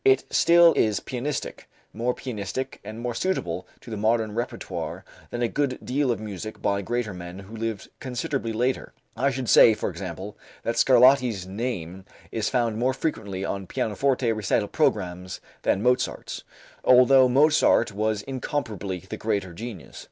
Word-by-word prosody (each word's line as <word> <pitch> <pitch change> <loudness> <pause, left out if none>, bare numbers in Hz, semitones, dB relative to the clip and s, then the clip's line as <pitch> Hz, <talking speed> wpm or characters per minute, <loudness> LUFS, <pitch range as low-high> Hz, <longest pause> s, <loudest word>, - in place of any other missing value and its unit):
It 135 0 +5
still 170 -1 +6
is 105 -3 +2
pianistic; 140 +3 -4 0.2
more 120 +3 -1
pianistic 130 +2 -5
and 110 +2 -8
more 120 0 -3
suitable 95 - -2
to 115 - -11
the 110 - -3
modern 110 0 +1
repertoire 120 +2 -4 0.2
than 120 0 -3
a - - +3
good 135 +1 -1
deal 135 +1 0
of 120 - 0
music 110 0 -6
by 100 0 0
greater 115 0 -2
men 90 0 -8
who 100 +3 -10
lived 110 -2 -4
considerably 130 -1 -3
later. 125 +4 -1 0.2
I 140 - +2
should 130 -2 -3
say, 110 - +7
for - - -3
example, 95 +2 -7 0.3
that 115 - -1
Scarlatti's 125 -5 +5
name 95 -3 -4 0.3
is 110 -1 -1
found 115 -4 0
more 130 +1 +1
frequently 100 - -3
on 100 -1 -4
pianoforte 125 +5 0
recital 105 0 0
programs 90 -2 -1 0.2
than 100 - +1
Mozart's, 125 0 0 0.4
although 130 +1 +6
Mozart 135 -4 +4
was 105 0 -1
incomparably 110 - -3
the - - -5
greater 100 -5 -2
genius. 110 -2 -8
115 Hz, 150 wpm, -25 LUFS, 100-130 Hz, 0.4 s, say